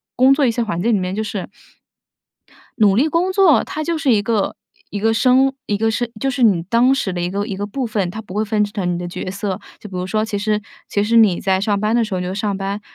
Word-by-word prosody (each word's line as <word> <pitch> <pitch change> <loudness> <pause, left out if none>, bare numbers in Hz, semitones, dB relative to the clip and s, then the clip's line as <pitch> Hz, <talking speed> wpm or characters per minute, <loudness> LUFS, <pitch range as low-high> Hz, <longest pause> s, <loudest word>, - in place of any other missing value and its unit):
工 260 +2 +5
作 275 0 +2
一 240 - +3
些 235 - -2
环 210 -6 -3
境 230 +4 +2
里 205 - +2
面， 185 +1 -3
就 220 - -1
是 200 -3 -5 1.3
努 205 -3 +4
力 265 +8 +3
工 335 +4 +1
作， 375 -6 +4
它 310 - -5
就 335 +2 -1
是 310 -4 +1
一 210 -3 +3
个 210 -2 0 0.3
一 205 - -4
个 225 +2 +2
生 260 +3 +3
一 205 - 0
个 225 +1 +1
是 235 +1 -2
就 270 +3 0
是 265 0 -3
你 195 -8 +4
当 235 +8 +3
时 195 -8 -2
的 175 - -3
一 175 - -1
个 200 +2 -2
一 205 -3 -4
个 205 +1 -4
部 255 +5 -3
分， 210 -5 -1
它 215 - -7
不 185 - -11
会 210 +2 0
分 210 0 +1
成 200 -3 -3
你 175 - -2
的 175 0 -5
角 180 +1 -5
色。 200 0 -3 0.2
就 - - -10
比 190 - -9
如 180 0 -3
说， 215 +2 0
其 215 - -4
实 210 +1 0 0.3
其 205 - 0
实 225 +3 +1
你 215 -6 +5
在 190 -1 +1
上 205 -1 0
班 215 +2 +1
的 240 - +3
时 210 -4 -3
候， - - -1
你 - - -3
就 180 - -3
上 200 0 -2
班， 195 +1 -3
210 Hz, 300 characters per minute, -19 LUFS, 195-235 Hz, 1.3 s, 工